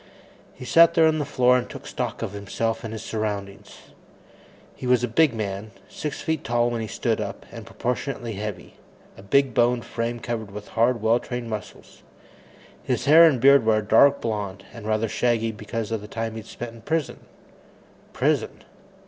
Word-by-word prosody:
He 125 - -9
sat 170 +4 +6
there 160 - +6
on 155 0 +2
the 145 - -1
floor 125 -3 +3
and 125 - -6
took - - -10
stock - - -4
of - - -3
himself 105 +3 -3
and 115 - -5
his 110 - -6
surroundings. 105 -3 -5 1.0
He 125 - -6
was 125 -1 +3
a - - +1
big 145 +6 +3
man 105 0 -4 0.2
six 150 - -5
feet 160 -2 -2
tall 120 -1 +1
when 115 -1 -2
he 110 - -4
stood - - -1
up, - - -6
and - - -10
proportionately 125 -1 -3
heavy, 100 -3 -7 0.4
a - - -13
big 135 +6 +2
boned 120 -1 +2
frame 120 0 -3
covered 115 -3 -4
with 105 +1 -9
hard, 115 0 +1
well 115 +2 +3
trained 120 -2 -6
muscles. 105 -1 -8 0.8
His - - -2
hair 160 +4 +8
and 145 -6 +3
beard 140 +2 +6
were 110 -1 +3
a 110 - -1
dark 135 +7 +5
blond, 100 -4 -4
and 115 -3 -9
rather 110 +1 +1
shaggy 115 0 0
because 110 +1 -5
of 110 -2 -2
the 105 - -9
time 115 +1 -4
he'd 110 -1 -8
spent 120 -1 -7
in 115 - -14
prison. 160 +4 -2 0.9
Prison! - - -1
115 Hz, 185 wpm, -24 LUFS, 110-125 Hz, 1.0 s, hair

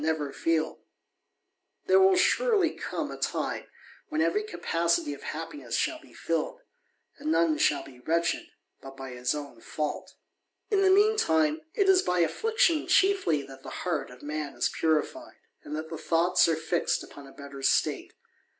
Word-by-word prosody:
never 155 -3 -1
feel: 160 -1 0 1.1
there 385 -1 +5
will 380 0 +6
surely 395 -2 +3
come - - -4
a - - -7
time, - - -2 0.4
when 310 - -2
ever^ 420 +6 +1
capacity 170 - 0
of 140 - -10
happiness 145 -6 -5
shall 320 -1 -1
be 305 - -18
filled, 165 -2 -2 0.6
and 155 - -2
none 165 -1 +3
shall 150 - +2
fan 125 -2 -14
wretched 170 +1 0 0.3
but 135 0 -11
by 135 -1 -7
his 125 +2 -1
own 140 -6 -8
fault. 150 -1 -4 0.6
In 400 -2 +3
the 385 - +5
mean 415 +3 +5
time, 320 -7 +2
it 400 -2 +2
is 380 -1 +6
by 180 - +1
affliction 335 - +2
chiefly 380 - +3
that 135 -1 -12
the - - -9 0.2
hea_r 175 -2 -1
of 125 +2 -14
man 150 -1 -4
is - - +1
purified, 155 -2 -1 0.3
and 150 - -6
that 160 +1 -6
the 160 - -5
thoughts 170 +2 +3
are 165 - +2
fixed 165 +2 -1
upon 140 -1 -12
better 140 -1 -9
state. - - +1
165 Hz, 165 wpm, -28 LUFS, -, 1.1 s, will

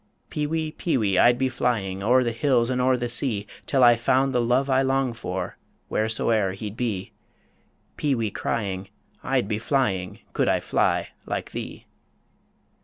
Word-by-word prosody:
Peewee, 155 +1 -1
peewee, 110 - 0
I'd 120 0 +5
be 130 +1 +1
flying 105 -7 -1
O'er 125 +5 +4
the 120 - 0
hills 120 0 +2
and 125 0 0
o'er 130 0 +3
the 120 0 -2
sea, 115 -4 0 0.2
Till 135 -2 +3
I 120 -1 +8
found 130 +3 +2
the 125 - +2
love 125 +3 +2
I 130 -1 +3
long 135 -2 +1
for 95 -6 -5 0.3
Whereso'er 110 -2 +1
he'd 105 +1 -6
be 115 -6 -3 0.9
Peewee 120 -8 0
crying, 95 -4 -3 0.3
I'd 130 -5 0
be 105 0 -1
flying, 115 -7 -1
Could - - +1
I - - +2
fly - - 0 0.2
like - - -3
thee! - - -7
120 Hz, 155 wpm, -25 LUFS, 105-130 Hz, 0.9 s, I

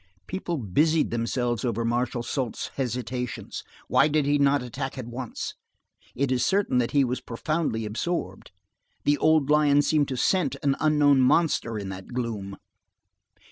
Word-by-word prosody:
People 175 -2 -3
busied 150 - +1
themselves 120 0 -1
over 115 -2 -1
Marshal 120 +1 -1
Soult's 125 -1 -3
hesitations. 125 -1 -4 0.2
Why 150 - +4
did 155 -1 +1 0.2
not 140 0 +3
he 125 - -6
attack 135 +2 -5
at 130 - -5
once? 120 0 -5 0.6
It 135 +1 0
is 125 -1 +1
certain 195 -10 +2
that 120 - +1
he 140 -1 +3
was 125 0 -2
profoundly 125 -1 -2
absorbed. 105 - -3 0.5
The 145 -1 +2
old 155 -2 +3
lion 145 -1 +4
seemed 150 -2 +2
to 130 - -4
scent 145 +1 +1
an 140 -1 +2
unknown 145 -3 +4
monster 130 -5 +2
in 100 -2 -5
that 95 +5 -8
gloom. 105 -6 -4
130 Hz, 150 wpm, -26 LUFS, 120-145 Hz, 0.6 s, Why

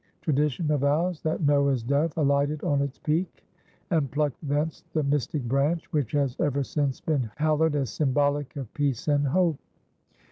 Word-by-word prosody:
Tradition 150 +1 0
avows 150 +4 +1
that 155 +1 -1
Noah's 140 -4 +3
dove 140 +6 +1
alighted 145 0 +1
on 140 -1 +1
its 140 -1 -3
peak, 165 +4 -2 0.5
and 155 -6 +2
plucked 145 0 -1
thence 150 +2 -2
the 155 - +1
mystic 145 0 -1
branch 140 +7 0
which 145 -7 0
has 140 -3 +1
ever 140 -1 +1
since 140 -1 -1
been 140 -8 -1
hallowed 155 0 +2
as 140 -3 -1
symbolic 145 -1 0
of 135 -6 -7
peace 145 -5 -1
and 145 -1 +2
hope. 170 0 +2
145 Hz, 155 wpm, -26 LUFS, 140-155 Hz, 0.5 s, Noah's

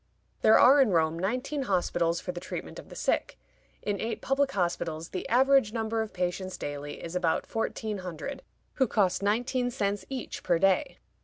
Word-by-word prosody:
There 220 - +7
are 275 +3 +7
in 260 - +4
Rome 165 -2 +2
nineteen 255 - -1
hospitals 175 -6 +1
for 180 - -4
the 175 - -6
treatment 185 - -6
of - - -12
the - - -10
sick. - - -1 0.5
In 205 -1 -2
eight 225 +1 -2
public 275 0 +1
hospitals 170 -5 -2
the 185 - -5
average 260 -2 +4
number 225 -1 -1
of 220 - -4
patients 185 +1 -3
daily 145 0 -6
is 170 +1 -6
about 175 -3 +1
fourteen 220 -2 -3
hundred, 185 - -6 0.4
who 260 - +5
cost 200 -4 +1
nineteen 245 +5 +1
cents 205 -4 -1
each 265 -3 -5
per 175 - +2
day. 195 - +2
200 Hz, 175 wpm, -28 LUFS, 175-245 Hz, 0.5 s, There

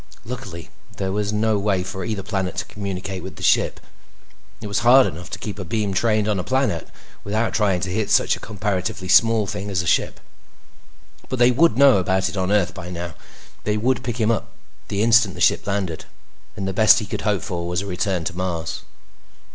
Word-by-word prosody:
Luckily, 110 -8 -7 0.3
there 95 -1 -2
was 105 +1 -1
no 105 0 +1
way 100 -2 0
for 95 0 -6
either 105 -1 -3
planet 95 -3 -2
to - - -2
communicate 95 -2 -5
with 95 +2 -8
the - - -10
ship; - - +2 0.8
it 110 - -9
was 100 -1 -1
hard 125 +3 +6
enough 85 +3 -6
to - - -5
keep 105 -1 -6
a - - -3
beam 100 +2 -2
trained 110 +1 +1
on 105 -3 0
a - - -2
planet 130 - 0 0.4
without 110 +3 -1
trying 100 -5 +1
to 90 - -2
hit 110 +1 -1
such - - +3
a - - -11
comparatively 95 -2 -3
small 115 +3 +5
thing 105 -1 -5
as 90 -3 0
a - - -8
ship. - - +1 1.1
But 130 - -2
they 120 +1 +5
would 130 -1 +3
know 140 -4 +7
about 95 0 +1
it 85 - -7
on 95 0 -1
Earth 105 -4 +2
by 90 -3 -8
now. 85 -1 -5 0.5
They 105 0 0
would 125 +4 0
pick 120 -1 -3
him 110 -1 +2
up 115 0 -1 0.4
the 100 0 -1
instant 115 -4 +4
the - - -9
ship - - +2
landed. 95 -5 -2 0.5
And 100 -3 -4
the 95 - -2
best 110 +2 +6
he 110 - -1
could - - -4
hope 105 -5 0
for 85 -1 -4
was 90 +1 -1
a - - -7
return 95 -1 -1
to 85 +1 -4
Mars. 85 -3 -3
100 Hz, 210 wpm, -22 LUFS, 90-110 Hz, 1.1 s, know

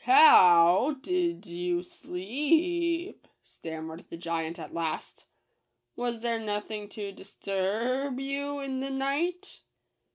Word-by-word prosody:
ho - - +1
ow 180 - +8
w 300 +1 -1
w - - -19
did 360 -2 -1
you 175 0 -2
sle 180 0 -9
e 330 - +1
e - - -8
ep - - -19
?" - - -51
stammered 160 0 -8
the 165 - -7
giant 165 0 -3
at 165 - -9
last. 165 -2 -4 0.7
"Was 240 -2 -3
there 230 -1 -1
nothing 210 -1 -4
to 205 -2 -6
dist 195 0 -16
u 195 - -2
r 225 +8 0
r - - -2
b 265 0 -4
you 280 +1 -3
in 265 -1 -3
the 270 +1 -3
night 295 +8 -2
235 Hz, 170 wpm, -28 LUFS, 180-285 Hz, 0.7 s, ow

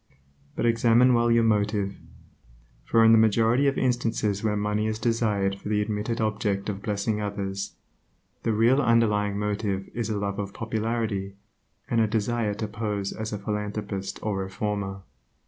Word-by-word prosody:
But - - -1
examine 120 +2 +4
well 120 0 +3
your 115 0 +4
motive, 105 -2 +1 0.9
for 115 0 +4
in 110 - +7
the 115 - +7
majority 115 +5 +3
of 140 - +1
instances 115 -5 0
where 105 -1 +1
money 105 +1 0
is 110 0 -1
desired 105 -4 0
for 105 - -7
the 105 -1 +1
admitted 105 +2 -2
object 105 -2 -1
of 100 -1 -4
blessing 105 +1 -1
others, 100 -1 -4 0.7
the 115 - 0
real 115 +6 +4
underlying 105 -4 +2
motive 105 -2 -2
is 120 -1 -3
a 105 - -1
love 100 0 -2
of 100 -1 -5
popularity, 110 -3 -2 0.5
and 115 -1 +2
a 110 - +3
desire 110 0 0
to 110 +1 -3
pose 105 -2 -3
as 110 0 -5
a 105 - -2
philanthropist 105 -1 -4
or 105 -2 -1
reformer. 95 0 -3
105 Hz, 160 wpm, -26 LUFS, 100-115 Hz, 0.9 s, in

